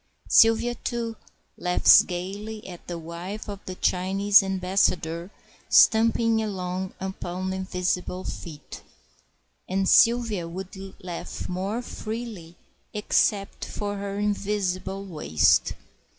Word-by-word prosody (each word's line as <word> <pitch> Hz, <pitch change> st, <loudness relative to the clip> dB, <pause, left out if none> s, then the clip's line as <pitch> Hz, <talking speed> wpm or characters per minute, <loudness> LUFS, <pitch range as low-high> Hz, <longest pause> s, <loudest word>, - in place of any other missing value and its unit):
Sylvia, 225 Hz, +2 st, +5 dB
too, 235 Hz, -1 st, -4 dB, 0.4 s
laughs 180 Hz, 0 st, +6 dB
gayly 200 Hz, +5 st, -6 dB
at 175 Hz, -2 st, -11 dB
the 175 Hz, -, -4 dB
wife 170 Hz, +5 st, -7 dB
of 200 Hz, -1 st, -6 dB
the 185 Hz, -, -5 dB
Chinese 195 Hz, +3 st, +3 dB
ambassador 185 Hz, -3 st, 0 dB, 0.4 s
stumping 225 Hz, 0 st, +5 dB
along 185 Hz, -3 st, -4 dB
upon 190 Hz, -1 st, -4 dB
invisible 185 Hz, -1 st, -2 dB
feet; 150 Hz, -4 st, -8 dB, 0.9 s
and 190 Hz, +1 st, 0 dB
Sylvia 230 Hz, -7 st, +4 dB
would 185 Hz, +3 st, -7 dB, 0.3 s
laugh 175 Hz, -2 st, -6 dB
more 195 Hz, +6 st, -3 dB
freely 215 Hz, -8 st, -6 dB, 0.4 s
except 205 Hz, -1 st, +1 dB
for 205 Hz, -1 st, -4 dB
her 200 Hz, 0 st, -4 dB
invisible 200 Hz, -2 st, -2 dB
waist. 80 Hz, -, +2 dB
190 Hz, 100 wpm, -25 LUFS, 180-210 Hz, 0.9 s, laughs